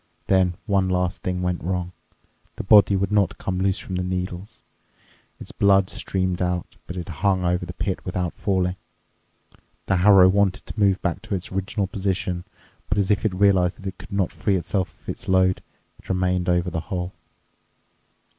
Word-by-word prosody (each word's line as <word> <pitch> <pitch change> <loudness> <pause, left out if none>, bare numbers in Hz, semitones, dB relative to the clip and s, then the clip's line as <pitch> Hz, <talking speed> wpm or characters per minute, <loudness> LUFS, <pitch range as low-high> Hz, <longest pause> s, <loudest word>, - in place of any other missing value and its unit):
Then 95 -2 +2
one 95 -2 +1
last 90 0 -1
thing 90 0 -2
went 90 -1 -2
wrong: 90 0 -2 0.6
the - - -5
body 100 0 +6
would 95 +1 0
not 100 -4 +2
come 90 -1 -3
loose 95 0 +1
from 95 - -4
the 90 - -1
needles. 90 +2 -5 0.8
Its - - -8
blood 100 -1 +3
streamed 95 -1 -2
out, 90 -1 -2
but 90 - -6
it 85 - -5
hung 95 -3 +2
over 90 0 0
the 90 - -6
pit 95 +1 -3
without 90 -2 -2
falling. 95 -2 -1 1.1
The 95 - +1
harrow 95 0 +7
wanted 100 0 +2
to - - -7
move 100 -2 +3
back 85 +2 -1
to 100 - -3
its 90 - -5
original 95 +2 -1
position, 95 -2 -2 0.4
but, 105 - 0
as 100 0 +2
if 100 - +1
it 100 -4 0
realized 95 -2 +3
that 100 - -13
it 95 - -5
could - - -12
not 100 -3 0
free 100 -3 0
itself 90 +1 -2
of - - -29
its - - -5
load, 95 0 +3 0.4
it - - -18
remained 90 -1 0
over 90 0 +1
the 80 - -2
hole. 90 +1 -4
95 Hz, 185 wpm, -23 LUFS, 90-95 Hz, 1.1 s, harrow